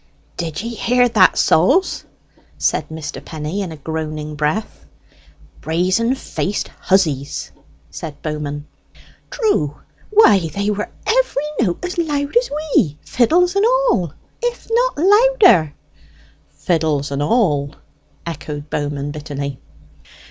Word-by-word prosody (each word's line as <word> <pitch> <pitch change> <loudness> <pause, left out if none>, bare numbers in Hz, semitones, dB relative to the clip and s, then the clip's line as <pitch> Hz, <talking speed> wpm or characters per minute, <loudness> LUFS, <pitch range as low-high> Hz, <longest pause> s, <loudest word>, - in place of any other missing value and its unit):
"Did 165 +2 -4
ye 230 - -3
hear 245 +2 +2
that, 210 -5 +4
souls?" 275 - +3 0.5
Mr. 160 -1 -2
Penny 155 +4 -5
said, 200 - -1
in 175 - -7
a 160 - -8
groaning 155 0 -4
breath. 150 - -3 0.7
"Brazen 185 - +1
faced 205 -5 -3
hussies!" 155 -8 0 0.4
said 145 -3 -7
Bowman. 150 -1 -4 0.6
"True; 155 - 0 0.3
why, 210 - +5
they 200 +1 0
were 210 0 -3 0.2
every 455 - +1 0.2
note 195 - -1
as 360 0 -4
loud 290 -2 -1
as 485 +1 +3 0.2
we, 155 - +3
fiddles 350 +9 +2
and 395 - +3
all, 485 - +2 0.3
if 485 0 -3
not - - +2
louder!" 395 - +5 0.7
"Fiddles 155 -4 -1
and 140 0 -2
all!" 150 - +1 0.5
echoed 150 -2 -6
Bowman 145 -1 -2
bitterly. 145 -2 -5
175 Hz, 115 wpm, -19 LUFS, -, 0.7 s, why